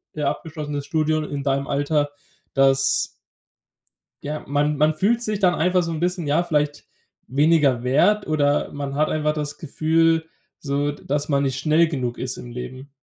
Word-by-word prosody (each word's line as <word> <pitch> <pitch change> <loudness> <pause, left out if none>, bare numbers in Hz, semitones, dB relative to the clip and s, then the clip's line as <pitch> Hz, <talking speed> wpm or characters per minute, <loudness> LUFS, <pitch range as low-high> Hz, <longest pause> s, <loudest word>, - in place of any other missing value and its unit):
ja, 150 -2 0
abgeschlossenes 150 -3 -5
Studium 155 -1 0
in 145 -1 -4
deinem 140 0 0
Alter, 145 +1 0 0.4
dass 135 -1 +3 1.2
ja, 150 +1 -5
man 145 +2 +1
man 155 +2 +3
fühlt 225 +8 +2
sich 215 -3 -1
dann 180 -3 +4
einfach 180 +2 +2
so 165 - -3
'n 160 - -3
bisschen, 175 0 -1
ja, 150 +4 +2
vielleicht 150 -3 -1 0.4
weniger 145 -3 +3
wert 155 +12 +3
oder 145 -2 +1
man 140 -1 -5
hat 155 +1 +2
einfach 150 0 0
das 150 -1 -4
Gefühl 165 +2 +1 0.3
so, 145 0 -1
d - - -15
dass 145 +1 -1
man 140 -2 +1
nicht 135 -1 -1
schnell 160 +3 +3
genug 125 -6 -3
ist 125 -1 -4
im 120 - -9
Leben. 130 +3 -8
150 Hz, 170 wpm, -22 LUFS, 140-160 Hz, 1.2 s, dann